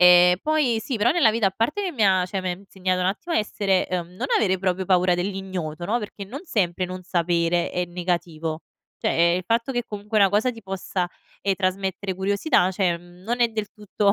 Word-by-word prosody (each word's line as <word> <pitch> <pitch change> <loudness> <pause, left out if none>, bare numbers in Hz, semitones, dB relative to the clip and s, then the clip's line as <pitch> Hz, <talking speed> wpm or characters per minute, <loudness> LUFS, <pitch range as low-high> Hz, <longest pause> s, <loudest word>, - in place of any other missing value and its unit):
Ehm, 180 0 +7
poi 300 -7 +2
sì 245 +2 -3
però 215 +3 +3
nella 330 -10 +5
vita 220 -2 +1
a - - +2
parte 230 - 0
che 370 - -2
mi 230 -8 +1
ha, 185 -2 +4
cioè 190 +1 -3
mi 185 -1 -2
ha 180 - -4
insegnato 185 -2 -2
un 180 - +1
attimo 330 - -2
a - - +4
essere, 200 -3 +1
ehm 175 -2 -3
non 250 - -2
avere 190 -3 +2
proprio 185 0 0
paura 180 -1 +4
dell'ignoto, 180 -3 -4
no, 230 +5 +1
perché 205 -1 -7
non 255 +9 -7
sempre 185 - 0
non 185 0 -6
sapere 170 -1 +1
è 180 0 -1
negativo. 170 -2 -3 0.4
Cioè - - 0 0.3
ehm, - - +1
il 185 - -7
fatto 230 +3 +1
che 245 -1 -1
comunque 210 +1 -2
una 200 - +6
cosa 215 +5 +2
ti 230 -3 -11
possa, 190 -1 -3 0.3
ehm, 200 -1 +2
trasmettere 190 0 -2
curiosità, 195 - +2
cioè 190 0 +1
ehm, 175 +1 -6
non 240 +2 -2
è 235 - +5
del 215 -2 -4
tutto 205 -1 +1
190 Hz, 220 wpm, -24 LUFS, 180-215 Hz, 0.4 s, Ehm